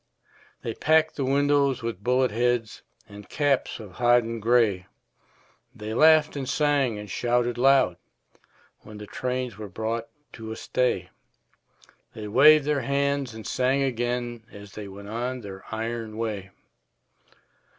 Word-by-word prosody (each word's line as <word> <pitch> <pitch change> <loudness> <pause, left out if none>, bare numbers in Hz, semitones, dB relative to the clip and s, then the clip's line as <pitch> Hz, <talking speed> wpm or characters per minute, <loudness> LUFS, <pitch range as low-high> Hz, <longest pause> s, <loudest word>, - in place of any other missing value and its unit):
They 115 - -3
packed 160 +5 +2
the 140 - -2
windows 140 -1 +2
with 115 -4 -5
bullet 125 0 +2
heads 120 0 -1 0.3
And 105 -1 -12
caps 145 -5 0
of 105 -4 -10
hodden 120 +2 +2
gray; 110 -5 +2 0.9
They 105 +1 -6
laughed 155 +3 +5
and 135 -2 -4
sang 145 -7 +1
and 105 0 -8
shouted 120 +3 0
loud 130 -9 +4 0.8
When 105 0 -12
the 105 - -8
trains 125 -1 -4
were 105 -2 -7
brought 115 +4 -3 0.3
to 110 -1 -8
a - - -4
stay; 95 -9 -1 1.0
They 110 -1 -6
waved 145 +6 +6
their 150 -2 +1
hands 140 -3 -1
and 110 - -9
sang 130 +2 +1
again 120 -2 -2
As 100 0 -12
they 105 0 -8
went 100 +1 -10
on 125 +3 -3
their 95 -3 -9
iron 110 0 -4
way. 105 -4 -4
120 Hz, 140 wpm, -25 LUFS, 110-135 Hz, 1.0 s, waved